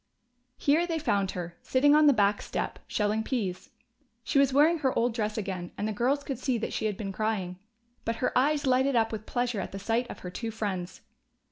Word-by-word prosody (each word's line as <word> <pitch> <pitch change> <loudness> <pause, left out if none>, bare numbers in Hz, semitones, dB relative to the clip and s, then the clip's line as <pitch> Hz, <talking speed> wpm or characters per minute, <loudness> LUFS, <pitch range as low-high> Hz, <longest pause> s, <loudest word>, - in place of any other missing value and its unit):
Here 315 +5 +2
they 330 -2 -1
found 200 - 0
her, 175 -1 -5
sitting 285 +3 +3
on 305 0 +6
the - - +8
back 205 -4 +2
step, - - -4
shelling 210 +1 0
peas. 195 -7 -3 0.5
She 275 - +2
was 275 -1 +4
wearing 310 +5 +4
her 265 -3 0
old 235 0 +2
dress 215 -2 -2
again, 185 -4 -4
and 210 - -1
the 215 - -2
girls 260 +7 +1
could 275 -2 -4
see 260 -4 0
that 225 - -4
she 220 - 0
had 205 -3 -3
been 200 -3 -4
crying. 195 -4 -2 0.4
But 230 - -1
her 250 - -1
eyes 290 +3 +2
lighted 260 +1 +3
up 225 -1 +2
with 215 -1 -6
pleasure 245 -3 -1
at 190 - -4
the 195 - -6
sight 230 +5 -1
of - - -7
her 180 - -6
two 230 +5 -4
friends. 195 -5 -4
225 Hz, 220 wpm, -28 LUFS, 200-270 Hz, 0.5 s, the